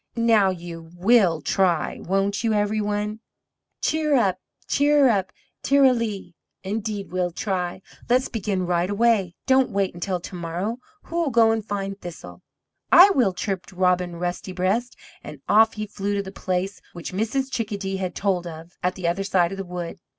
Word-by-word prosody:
Now 225 Hz, -4 st, +4 dB
you 170 Hz, -2 st, -7 dB
WILL 185 Hz, -4 st, +3 dB
try, 180 Hz, -5 st, +1 dB
won't 195 Hz, +4 st, -1 dB
you, 225 Hz, -1 st, +2 dB
EVERY 210 Hz, +1 st, +1 dB
ONE?" 210 Hz, +1 st, -2 dB, 0.6 s
"Cheerup, 275 Hz, -, +2 dB, 0.3 s
cheerup, 275 Hz, -10 st, +3 dB, 0.3 s
ter 280 Hz, +1 st, +3 dB
ra 265 Hz, -, +7 dB
lee! 215 Hz, -7 st, -3 dB, 0.3 s
Indeed 205 Hz, 0 st, -4 dB
we'll 180 Hz, -1 st, 0 dB
try; 180 Hz, 0 st, -3 dB, 0.3 s
let's 255 Hz, +2 st, +3 dB
begin 195 Hz, -5 st, -2 dB
right 175 Hz, +1 st, 0 dB
away! 205 Hz, -4 st, +2 dB
Don't 265 Hz, -1 st, +4 dB
wait 195 Hz, -1 st, -1 dB
until 180 Hz, +1 st, -3 dB
to 180 Hz, -, -10 dB
morrow; 180 Hz, +7 st, -3 dB, 0.2 s
who'll 335 Hz, -2 st, -1 dB
go 225 Hz, -2 st, +4 dB
and 225 Hz, -1 st, -1 dB
find 200 Hz, -1 st, -4 dB
Thistle?" 175 Hz, -2 st, -9 dB, 0.5 s
"I 380 Hz, +3 st, +9 dB
will," 245 Hz, -, +3 dB
chirped 190 Hz, 0 st, -4 dB
Robin 180 Hz, -1 st, +1 dB
Rusty 175 Hz, +2 st, -4 dB
breast, 195 Hz, +7 st, -1 dB, 0.3 s
and -, -, -9 dB
off 220 Hz, +2 st, +5 dB
he 215 Hz, 0 st, -4 dB
flew 205 Hz, -1 st, -3 dB
to 200 Hz, -, -1 dB
the 190 Hz, -, -8 dB
place 185 Hz, 0 st, -3 dB
which 175 Hz, +1 st, -7 dB
Mrs. 245 Hz, +7 st, -1 dB
Chickadee 200 Hz, -5 st, -3 dB
had 185 Hz, -2 st, -4 dB
told 185 Hz, -3 st, 0 dB
of, 165 Hz, +1 st, -9 dB
at 180 Hz, +1 st, 0 dB
the 185 Hz, -3 st, -3 dB
other 175 Hz, +3 st, 0 dB
side 180 Hz, -3 st, +2 dB
of 195 Hz, -, -6 dB
the -, -, -2 dB
wood. 180 Hz, +1 st, -6 dB
195 Hz, 165 wpm, -24 LUFS, 180-225 Hz, 0.6 s, I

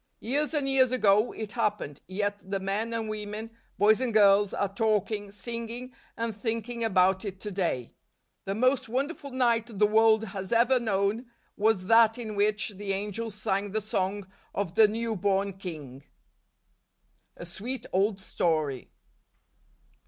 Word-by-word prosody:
Years 290 Hz, +7 st, -1 dB
and 285 Hz, -2 st, 0 dB
years 265 Hz, -2 st, +4 dB
ago 215 Hz, -2 st, +3 dB
it 215 Hz, -2 st, -6 dB
happened, 210 Hz, -, -2 dB
yet 205 Hz, +2 st, -2 dB
the 195 Hz, 0 st, -1 dB
men 200 Hz, +4 st, -2 dB
and 230 Hz, -1 st, -2 dB
women, 215 Hz, +1 st, -5 dB, 0.3 s
boys 215 Hz, +3 st, +4 dB
and 255 Hz, -2 st, 0 dB
girls, 205 Hz, -2 st, +5 dB
are 200 Hz, -1 st, -2 dB
talking, 210 Hz, -1 st, 0 dB
singing 235 Hz, +4 st, -6 dB, 0.2 s
and 230 Hz, -2 st, -2 dB
thinking 230 Hz, +2 st, -3 dB
about 190 Hz, -3 st, +3 dB
it 195 Hz, -2 st, -6 dB
to 210 Hz, -, -4 dB
day. 170 Hz, -11 st, -2 dB, 0.5 s
The 195 Hz, -, -2 dB
most 255 Hz, +1 st, +2 dB
wonderful 280 Hz, +4 st, -3 dB
night 235 Hz, -4 st, 0 dB
the 210 Hz, -, +5 dB
world 220 Hz, +1 st, +4 dB
has 195 Hz, -1 st, -6 dB
ever 240 Hz, +2 st, +4 dB
known, 215 Hz, +1 st, 0 dB, 0.3 s
was 210 Hz, -3 st, +1 dB
that 225 Hz, +1 st, +5 dB
in 220 Hz, -3 st, -5 dB
which 210 Hz, 0 st, +1 dB
the 200 Hz, -1 st, -4 dB
angels 210 Hz, +2 st, -3 dB
sang 200 Hz, -1 st, -2 dB
the 220 Hz, -, +1 dB
song 200 Hz, -1 st, -2 dB, 0.3 s
of 195 Hz, -4 st, -2 dB
the 215 Hz, +2 st, +6 dB
new 225 Hz, +1 st, -2 dB
born 195 Hz, 0 st, 0 dB
king. 145 Hz, -8 st, -8 dB, 1.3 s
A -, -, -8 dB
Sweet 230 Hz, +9 st, -5 dB
Old 195 Hz, +2 st, +2 dB
Story. 155 Hz, -8 st, -1 dB
210 Hz, 150 wpm, -28 LUFS, 195-230 Hz, 1.3 s, the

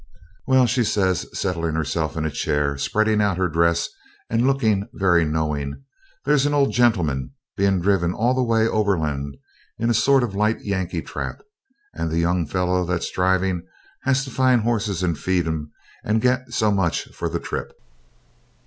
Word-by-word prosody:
'Well,' 130 Hz, -1 st, +5 dB
says 105 Hz, -7 st, +1 dB
she, -, -, -12 dB
settling 85 Hz, -4 st, -1 dB
herself 80 Hz, +1 st, -2 dB
in 80 Hz, -, -1 dB
a 80 Hz, -, -1 dB
chair, 75 Hz, 0 st, 0 dB
spreading 110 Hz, +9 st, +1 dB
out 100 Hz, -4 st, +1 dB
her 95 Hz, 0 st, +1 dB
dress, 85 Hz, 0 st, +2 dB, 0.4 s
and 115 Hz, +3 st, +2 dB
looking 110 Hz, -7 st, +1 dB
very 90 Hz, -4 st, +3 dB
knowing, 75 Hz, -, -2 dB, 0.4 s
'there's 145 Hz, -1 st, +3 dB
an 145 Hz, -, 0 dB
old 140 Hz, -1 st, +3 dB
gentleman 85 Hz, -, +1 dB, 0.2 s
being 100 Hz, -1 st, +2 dB
driven 90 Hz, -2 st, +2 dB
all 115 Hz, +7 st, +1 dB
the 130 Hz, -, +1 dB
way 115 Hz, -2 st, +2 dB
overland 75 Hz, -11 st, -1 dB, 0.4 s
in 115 Hz, +1 st, +1 dB
a -, -, +3 dB
sort 135 Hz, +4 st, +4 dB
of 115 Hz, -5 st, -3 dB
light 105 Hz, +3 st, +1 dB
Yankee 95 Hz, -4 st, -2 dB
trap, -, -, -6 dB, 0.5 s
and 85 Hz, -, -3 dB
the 80 Hz, -, -2 dB
young 85 Hz, -1 st, +1 dB
fellow 90 Hz, +1 st, 0 dB
that's 90 Hz, -1 st, -2 dB
driving 95 Hz, -1 st, +1 dB, 0.4 s
has 135 Hz, 0 st, +1 dB
to 135 Hz, -, -8 dB
find 130 Hz, -1 st, +3 dB
horses 105 Hz, -5 st, -1 dB
and 85 Hz, -3 st, -1 dB
feed 90 Hz, -2 st, 0 dB
'em, 75 Hz, -2 st, -3 dB, 0.3 s
and 110 Hz, +1 st, +1 dB
get 125 Hz, +1 st, 0 dB
so 110 Hz, -3 st, +2 dB
much 95 Hz, -5 st, 0 dB
for -, -, -3 dB
the -, -, -2 dB
trip.' -, -, -5 dB
95 Hz, 170 wpm, -22 LUFS, 85-115 Hz, 0.5 s, Well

